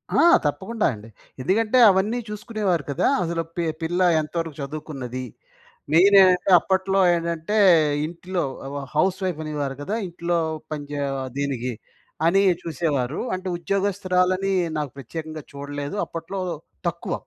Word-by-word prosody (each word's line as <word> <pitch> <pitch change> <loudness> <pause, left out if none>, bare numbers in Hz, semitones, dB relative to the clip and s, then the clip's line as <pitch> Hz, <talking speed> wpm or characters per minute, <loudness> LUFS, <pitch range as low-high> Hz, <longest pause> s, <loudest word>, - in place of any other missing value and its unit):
ఆ! - - +4 0.3
తప్పకుండా 190 +10 -1
అండి. 110 +1 -11 0.3
ఎందుకంటే, 215 - +2
అవన్నీ 205 +5 +1
చూసుకునేవారు 210 - -1
కదా! 140 - +1 0.2
అసలు 170 0 -1
పి 175 - -1 0.2
పిల్ల 175 +3 -1 0.2
ఎంత 155 +1 -5
వరకు 165 -3 -4
చదువుకున్నది. 135 -3 -5 0.7
మెయిన్ 195 +5 +6
ఏంటంటే 185 0 +4
అప్పట్లో 190 +2 0
ఏంటంటే 170 +4 -1 0.5
ఇం‌టిలో 175 +2 -4 0.3
వ 145 - -4 0.2
హౌస్ 185 +5 +2
వైఫ్ 180 -4 -2
అనేవారు 145 -3 -3
కదా! 200 +9 -3
ఇంట్లో 170 0 -1 0.3
పని‌చే 145 -1 -4 0.4
దీనికి 130 -3 -2 0.5
అని 195 +4 +4 0.2
చూసేవారు. 150 -4 -1
అంటే 185 0 -4
ఉద్యోగస్తురాలని 190 0 0 0.3
నాకు 150 -3 -2
ప్రత్యేకంగా 155 +3 -7
చూడలేదు. 145 +4 -5
అప్పట్లో 165 +4 -6 0.5
తక్కువ. 170 0 -4
170 Hz, 120 wpm, -23 LUFS, 145-190 Hz, 0.7 s, మెయిన్